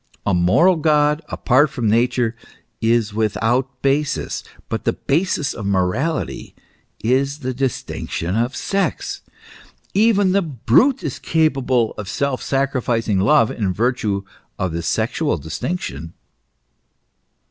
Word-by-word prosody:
A 105 - +1
moral 95 - +4
God 150 -1 +2
apart 140 +4 +3
from 120 -4 -2
Nature 120 +1 +2 0.5
is 115 -2 +2
without 115 +5 0
basis; 140 +1 0 0.2
but - - -3
the - - +1
basis 155 -1 0
of 105 -3 -5
morality 100 - -1 0.5
is 135 +5 +1
the 130 -1 -2
distinction 120 -8 -3
of 120 +4 0
sex. 195 0 -2 0.7
Even 205 -2 +3
the 200 +1 +3
brute 165 - +2
is - - -4
capable 135 -7 +1
of 105 -2 -5
self 140 +1 -1
sacrificing 125 -6 0
love 110 +3 +4
in 100 -5 -1
virtue 105 -1 0 0.3
of 95 -2 -1
the 85 +1 -3
sexual 80 - 0
distinction. 80 - -5
125 Hz, 115 wpm, -20 LUFS, 105-150 Hz, 0.7 s, moral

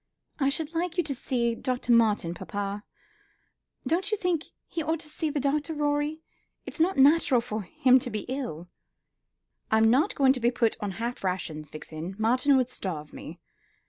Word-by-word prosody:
"I 275 -1 +3
should 315 +3 -2
like 345 +1 -2
you 350 - +3
to 295 -3 -1
see 240 -2 -1
Dr. 250 +1 -2
Martin, 215 -7 +3
papa. 200 +3 -4 1.0
Don't 365 +5 0
you 430 - 0
think 355 -6 0 0.2
he 330 - -3
ought 320 +1 -1
to - - -8
see 305 +1 -2
the 295 0 -1
doctor, 290 +3 0
Rorie? 295 +1 -1 0.4
It's - - -7
not 355 +4 +2
natural 275 -2 +5
for 220 -2 -4
him 255 +7 +4
to 245 - -5
be 215 -3 -3
ill." 245 - -5 1.0
"I'm 220 0 +4
not 270 +6 +2
going 265 -2 +5
to 260 - -3
be 240 0 +3
put 235 -2 +1
upon 205 -2 -4
half 235 +3 -4
rations, 160 -5 -3
Vixen. 160 +4 -7
Martin 255 +5 +3
would 255 -2 +2
starve 155 -10 -5
me. - - -9
255 Hz, 175 wpm, -27 LUFS, 215-300 Hz, 1.0 s, natural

